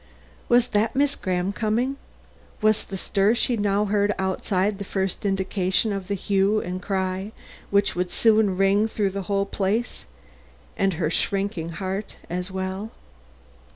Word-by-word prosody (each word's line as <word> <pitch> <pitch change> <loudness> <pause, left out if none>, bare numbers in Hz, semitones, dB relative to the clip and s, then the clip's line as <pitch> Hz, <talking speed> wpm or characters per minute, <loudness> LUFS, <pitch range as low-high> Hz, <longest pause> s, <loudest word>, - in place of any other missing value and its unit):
Was 245 0 +4
that 215 +2 +1
Miss 280 +1 +2
Graham 185 0 -1
coming? 235 +6 0 0.6
Was 215 0 +2
the 195 - -6
stir 200 +4 +2
she 240 +1 +1
now 205 -1 +1
heard 205 0 +1
outside, 190 +1 0
the - - -3
first 190 +1 -2
indication 190 +1 +1
of 195 -2 -4
the 200 - -1
hue 200 +2 +2
and 180 -1 -4
cry 190 +1 -2 0.4
which 200 0 +2
would 180 0 -1
soon 215 -2 +3
ring 195 +3 +3
through 205 -3 -1
the 200 +1 -3
whole 200 0 +2
place 205 +4 -2 0.7
and 195 -1 +1
her 160 -1 -1
shrinking 195 -4 -1
heart 190 +4 -4 0.2
as 180 +1 -2
well? 190 +2 -4
195 Hz, 150 wpm, -24 LUFS, 190-210 Hz, 0.7 s, Was